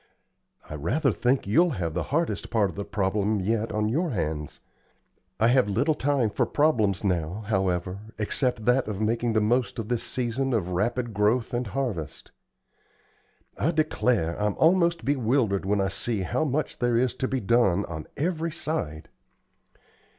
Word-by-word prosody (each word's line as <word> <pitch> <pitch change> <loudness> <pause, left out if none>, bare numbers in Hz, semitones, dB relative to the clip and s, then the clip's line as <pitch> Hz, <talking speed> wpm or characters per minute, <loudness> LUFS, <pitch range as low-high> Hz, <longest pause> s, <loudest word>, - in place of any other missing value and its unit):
I - - -8
rather 120 - 0
think 125 +5 +1
you'll 160 - +3
have 85 -3 -2
the 90 - -1
hardest 165 +4 -1
part 105 -5 +1
of - - -15
the 100 - -3
problem 105 +1 0
yet 110 +3 -1
on 105 -1 0
your 160 +10 0
hands. 80 - -3 0.8
I 115 +2 +4
have 125 -3 +3
little 140 +10 +2
time 135 -6 +1
for - - 0
problems 110 - +2
now, 90 +1 -1
however, 95 -2 -1 0.2
except 110 +1 -1
that 125 +1 +3
of 105 -3 -4
making 115 +2 0
the 110 - +3
most 115 0 +1
of 115 -1 -4
this 120 -2 0
season 130 +1 -2
of 95 -6 0
rapid 115 +5 -1
growth 110 +5 +1
and 120 0 -1
harvest. 105 - -4 1.3
I 155 - +2
declare 125 - 0
I'm 105 -1 +1
almost 170 -4 +3
bewildered 120 -7 +1
when 100 0 +2
I 95 -1 +1
see 110 +1 -2
how 155 - 0
much 150 +1 -2
there 120 -2 +2
is 125 0 +2
to 130 - -1
be 130 - -1
done 100 -4 +2
on 80 -2 -7
every 165 +1 -1
side. 85 - -4
115 Hz, 165 wpm, -26 LUFS, 100-130 Hz, 1.3 s, I